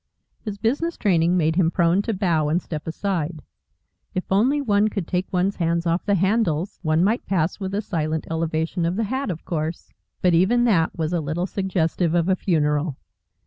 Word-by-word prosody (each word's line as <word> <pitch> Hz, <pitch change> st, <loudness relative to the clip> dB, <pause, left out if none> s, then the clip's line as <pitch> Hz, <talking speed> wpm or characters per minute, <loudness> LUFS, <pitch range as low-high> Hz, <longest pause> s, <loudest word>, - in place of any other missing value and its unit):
His 210 Hz, -3 st, -6 dB
business 285 Hz, +11 st, -1 dB
training 175 Hz, -3 st, +2 dB
made 160 Hz, -1 st, +1 dB
him 175 Hz, -3 st, +4 dB
prone 170 Hz, +2 st, +2 dB
to 225 Hz, +2 st, -2 dB
bow 170 Hz, -6 st, +1 dB
and 165 Hz, +3 st, +2 dB
step 155 Hz, -3 st, -7 dB
aside. 165 Hz, -3 st, -2 dB, 0.7 s
If 185 Hz, -, 0 dB
only 245 Hz, +10 st, +3 dB
one 210 Hz, -6 st, +2 dB
could 200 Hz, -5 st, -3 dB
take 180 Hz, 0 st, -2 dB
one's 185 Hz, +1 st, 0 dB
hands 170 Hz, 0 st, 0 dB
off 170 Hz, +4 st, 0 dB
the 200 Hz, -, +3 dB
handles, 190 Hz, -3 st, 0 dB
one 155 Hz, 0 st, +2 dB
might 220 Hz, +6 st, 0 dB
pass 175 Hz, -1 st, 0 dB
with 195 Hz, 0 st, -3 dB
a 210 Hz, -, -1 dB
silent 160 Hz, -4 st, -2 dB
elevation 165 Hz, +1 st, -1 dB
of 175 Hz, -, -1 dB
the 225 Hz, -, 0 dB
hat, 260 Hz, +4 st, -2 dB
of 165 Hz, -3 st, -5 dB
course. 160 Hz, 0 st, -4 dB, 0.3 s
But 180 Hz, -1 st, +4 dB
even 200 Hz, +9 st, +4 dB
that 185 Hz, -9 st, +2 dB
was 160 Hz, +1 st, -1 dB
a 170 Hz, -, +1 dB
little 155 Hz, +4 st, -2 dB
suggestive 180 Hz, -3 st, 0 dB
of 170 Hz, 0 st, +2 dB
a 190 Hz, -, +4 dB
funeral. 150 Hz, -5 st, 0 dB
180 Hz, 190 wpm, -23 LUFS, 160-200 Hz, 0.7 s, him